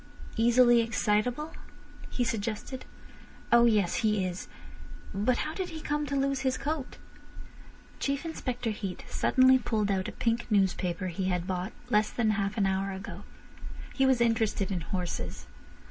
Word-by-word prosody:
"Easily 240 Hz, +1 st, +5 dB
excitable?" 230 Hz, +6 st, 0 dB, 0.6 s
he 245 Hz, -, -1 dB
suggested. 230 Hz, +2 st, -3 dB, 0.7 s
"Oh 235 Hz, 0 st, +7 dB
yes. 210 Hz, -6 st, +3 dB
He 210 Hz, -3 st, +1 dB
is. 180 Hz, 0 st, -5 dB, 0.7 s
But 215 Hz, +5 st, +1 dB
how 310 Hz, -, -2 dB
did 375 Hz, 0 st, -3 dB
he 320 Hz, -, -7 dB
come 295 Hz, -1 st, -2 dB
to 280 Hz, -, -2 dB
lose 275 Hz, 0 st, +1 dB
his 260 Hz, -1 st, 0 dB
coat—" 295 Hz, -2 st, -3 dB, 1.0 s
Chief 275 Hz, +2 st, -1 dB
Inspector 245 Hz, -7 st, -3 dB
Heat 200 Hz, -3 st, -5 dB
suddenly 260 Hz, 0 st, +4 dB
pulled 215 Hz, -4 st, 0 dB
out 190 Hz, -1 st, 0 dB
a -, -, -4 dB
pink 235 Hz, 0 st, -1 dB
newspaper 185 Hz, -3 st, +1 dB
he 185 Hz, +2 st, -3 dB
had 180 Hz, -2 st, 0 dB
bought 185 Hz, +2 st, -3 dB, 0.2 s
less 210 Hz, 0 st, +3 dB
than 220 Hz, -3 st, +1 dB
half 200 Hz, +1 st, -1 dB
an 200 Hz, -, +3 dB
hour 195 Hz, +1 st, 0 dB
ago. 190 Hz, +1 st, -7 dB, 0.7 s
He 270 Hz, -1 st, +3 dB
was 260 Hz, -2 st, +3 dB
interested 225 Hz, -4 st, +1 dB
in 180 Hz, -3 st, -1 dB
horses. 180 Hz, 0 st, -4 dB
225 Hz, 150 wpm, -29 LUFS, 195-255 Hz, 1.0 s, Oh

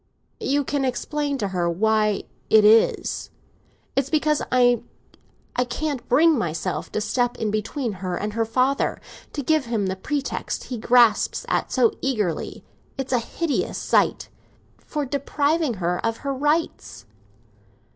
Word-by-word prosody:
"You 285 Hz, +1 st, +1 dB
can 280 Hz, 0 st, -1 dB
explain 285 Hz, +3 st, -1 dB
to 205 Hz, -6 st, -2 dB
her 175 Hz, -2 st, 0 dB
why 215 Hz, +3 st, +1 dB, 0.3 s
it 215 Hz, -1 st, +6 dB
is. 220 Hz, +2 st, +3 dB, 0.7 s
It's 275 Hz, 0 st, +1 dB
because 305 Hz, -1 st, +2 dB
I 245 Hz, -2 st, +4 dB, 0.9 s
can't 290 Hz, -5 st, -3 dB
bring 315 Hz, +6 st, +5 dB
myself 170 Hz, 0 st, -3 dB
to -, -, 0 dB
step 240 Hz, +3 st, 0 dB
in 220 Hz, -2 st, -1 dB
between 225 Hz, +4 st, -2 dB
her 180 Hz, -2 st, -2 dB
and 210 Hz, +1 st, -3 dB
her 225 Hz, +1 st, +1 dB
father—to 265 Hz, +4 st, -2 dB
give 310 Hz, 0 st, +2 dB
him 225 Hz, -4 st, -1 dB
the 190 Hz, 0 st, -1 dB
pretext 280 Hz, +8 st, -3 dB
he 245 Hz, -3 st, -5 dB
grasps 235 Hz, -1 st, +3 dB
at—so 245 Hz, -4 st, +2 dB
eagerly 210 Hz, -, -2 dB, 0.3 s
(it's 270 Hz, -1 st, -3 dB
a 245 Hz, -, +4 dB
hideous 300 Hz, +6 st, -2 dB
sight) -, -, +1 dB, 0.5 s
for 295 Hz, -2 st, -4 dB
depriving 285 Hz, +1 st, 0 dB
her 180 Hz, -1 st, -2 dB
of 230 Hz, 0 st, 0 dB
her 275 Hz, -, 0 dB
rights." 290 Hz, -, -1 dB
245 Hz, 135 wpm, -23 LUFS, 215-285 Hz, 0.9 s, it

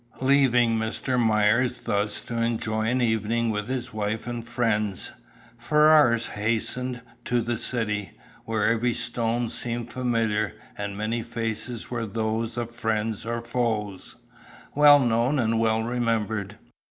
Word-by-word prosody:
Leaving 125 Hz, -4 st, +4 dB
Mr. 120 Hz, +3 st, -1 dB
Myers 110 Hz, +3 st, +2 dB
thus 105 Hz, 0 st, -1 dB
to 120 Hz, -, -7 dB
enjoy 110 Hz, -1 st, -1 dB
an 125 Hz, +2 st, +1 dB
evening 115 Hz, 0 st, +1 dB
with 105 Hz, -1 st, -3 dB
his 130 Hz, -2 st, -3 dB
wife 110 Hz, 0 st, -2 dB
and 120 Hz, -1 st, -4 dB
friends, 110 Hz, -4 st, -1 dB, 0.5 s
Ferrars 150 Hz, -4 st, +5 dB
hastened 115 Hz, +4 st, -2 dB, 0.2 s
to 120 Hz, -, +1 dB
"the 120 Hz, +1 st, -1 dB
city," 105 Hz, -5 st, -2 dB, 0.3 s
where 110 Hz, -2 st, -1 dB
every 115 Hz, +1 st, +2 dB
stone 120 Hz, 0 st, -1 dB
seemed 120 Hz, +1 st, -4 dB
familiar, 115 Hz, -5 st, 0 dB, 0.2 s
and 100 Hz, -1 st, -5 dB
many 110 Hz, +2 st, -1 dB
faces 115 Hz, 0 st, -4 dB
were 115 Hz, -2 st, -2 dB
those 110 Hz, +2 st, -2 dB
of 120 Hz, -1 st, -3 dB
friends 110 Hz, -1 st, -2 dB
or 120 Hz, 0 st, -2 dB
foes, 115 Hz, -5 st, -2 dB, 0.6 s
well 145 Hz, 0 st, +8 dB
known 120 Hz, +2 st, +2 dB
and 115 Hz, -3 st, +1 dB
well 110 Hz, 0 st, +2 dB
remembered. 110 Hz, -4 st, -1 dB
115 Hz, 130 wpm, -25 LUFS, 110-120 Hz, 0.6 s, well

